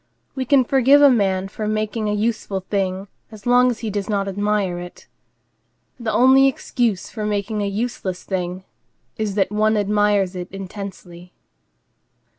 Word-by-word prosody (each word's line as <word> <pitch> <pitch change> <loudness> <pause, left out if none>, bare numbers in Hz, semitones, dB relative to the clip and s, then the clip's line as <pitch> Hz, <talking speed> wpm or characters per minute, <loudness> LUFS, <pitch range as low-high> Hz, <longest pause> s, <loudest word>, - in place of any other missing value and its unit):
We 260 -1 -3
can 275 0 +4
forgive 270 +3 +4
a 285 - +8
man 195 -5 +1
for 210 +2 -5
making 215 0 -1
a 210 - 0
useful 210 -3 -2
thing 190 0 -2 0.2
as 215 -2 -13
long 245 +1 +5
as 235 -3 -4
he 220 -2 -3
does 200 0 -3
not 200 -2 0
admire 200 -2 -1
it. 175 0 -10 0.9
The 230 -2 -2
only 265 +3 +5
excuse 240 -6 -1
for 215 - -5
making 210 0 -2
a 200 - -1
useless 200 -3 -3
thing 185 -1 -4 0.5
is 215 -3 -2
that 195 -1 +1
one 215 +1 +2
admires 205 -2 +1
it 180 0 -6
intensely. 190 -2 -9
210 Hz, 155 wpm, -21 LUFS, 195-225 Hz, 0.9 s, a